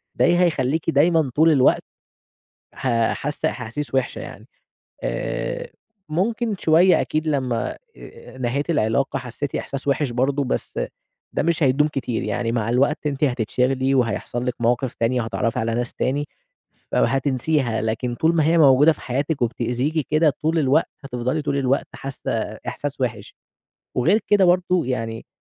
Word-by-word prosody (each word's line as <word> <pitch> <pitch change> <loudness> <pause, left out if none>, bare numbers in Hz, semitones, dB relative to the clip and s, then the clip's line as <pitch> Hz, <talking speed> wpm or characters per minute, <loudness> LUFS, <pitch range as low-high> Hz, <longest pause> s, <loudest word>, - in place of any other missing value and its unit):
دي 175 0 +3
هيخليكِ 160 -3 +1
دايمًا 160 -2 +3
طول 160 +2 +5
الوقت 135 -4 +4 0.9
ح 135 - -3 0.2
حاسة 150 +2 -2
أحاسيس 125 +4 -6
وحشة 130 -2 0
يعني. - - -10 0.6
آآ، - - -3 0.4
ممكن 220 +6 0
شوية 170 +4 +5
أكيد 155 +1 -2
لمّا 130 -6 -1 0.6
نهيتِ 130 +6 -1
العلاقة 135 -1 +1
حسيتِ 130 +3 -5
إحساس 140 0 -5
وحش 140 -2 +1
برضه 135 +4 +1
بس 130 - -3 0.5
ده - - 0
مش 165 -1 +1
هيدوم 140 +3 +3
كتير، 130 -6 -3
يعني 120 -1 -1
مع 115 -1 -1
الوقت 140 +5 +1
أنتِ 145 +1 0
حتتشغلي 130 +2 0
وهيحصل 120 0 -1
لِك 125 - 0
مواقف 120 +1 +1
تانية 120 +2 +1
هتتعرفي 115 +1 -1
على 115 0 -1
ناس 120 0 -2
تاني 145 +3 -1 0.7
أو - - +4
هتنسيها، 135 -2 0
لكن 115 +2 -2
طول 165 +6 +2
ما 160 - +3
هي 165 +1 +3
موجودة 145 +1 +6
في - - -16
حياتِك 140 +3 -2
وبتأذيكِ 125 +6 -1
كده 155 +1 +4
طول 160 +1 +2
الوقت 140 +3 +2
هتفضلي 130 +3 -2
طول 140 -1 -1
الوقت 135 0 +1
حاسة 135 -1 -5 0.4
إحساس 135 +3 -4
وحش، 120 -5 -3 0.6
وغير 180 - +3
كده 205 -2 +5
برضه 180 -3 +2
يعني 115 -3 -3
135 Hz, 145 wpm, -22 LUFS, 125-155 Hz, 0.9 s, موجودة